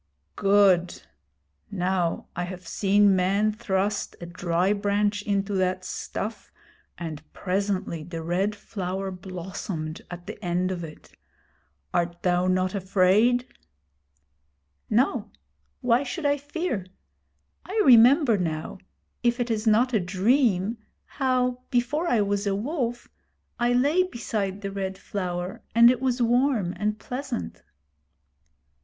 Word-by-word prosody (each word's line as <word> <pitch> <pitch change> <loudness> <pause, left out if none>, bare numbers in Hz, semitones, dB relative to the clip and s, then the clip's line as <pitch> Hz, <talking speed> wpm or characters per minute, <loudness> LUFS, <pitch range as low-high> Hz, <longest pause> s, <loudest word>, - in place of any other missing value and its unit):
'Good! 195 -3 +3 0.7
Now 180 -2 -1
I 180 - -2
have 180 -1 -8
seen 200 0 +3
men 195 +4 +2
thrust 200 -1 -1
a 175 - -7
dry 175 +2 0
branch 205 0 0
into 200 0 -1
that 185 -1 0
stuff, 215 +3 -5 0.5
and 160 -3 -6
presently 190 -3 -2
the 165 0 -6
Red 190 +5 0
Flower 195 -2 -4
blossomed 180 -3 -6
at 175 0 -8
the - - -9
end 180 +1 0
of 175 -2 -4
it. 155 -2 -11 0.8
Art 170 0 -1
thou 180 0 +2
not 185 0 +1
afraid?' 200 +6 +3 1.4
'No. 245 +6 +1 0.5
Why 245 -1 +3
should 285 +4 -5
I 285 0 +4
fear? 290 - -3 0.8
I 415 +4 -3
remember 245 - +6
now 160 +1 -3 0.4
if 240 +1 +1
it 240 -1 -1
is 220 0 -1
not 240 +4 +4
a 220 - +4
dream 205 +2 +1 0.3
how, 250 -2 0
before 280 +7 0
I 235 -9 +3
was 200 0 0
a 195 - +1
Wolf, 240 - -3 0.5
I 240 0 +2
lay 285 +8 +3
beside 215 - -3
the 200 -1 -4
Red 190 -1 -4
Flower, 180 -2 -4
and 235 +1 +8
it 250 -1 -2
was 250 -2 +1
warm 240 -6 +2
and 210 0 0
pleasant.' 215 - -5
200 Hz, 125 wpm, -26 LUFS, 185-240 Hz, 1.4 s, and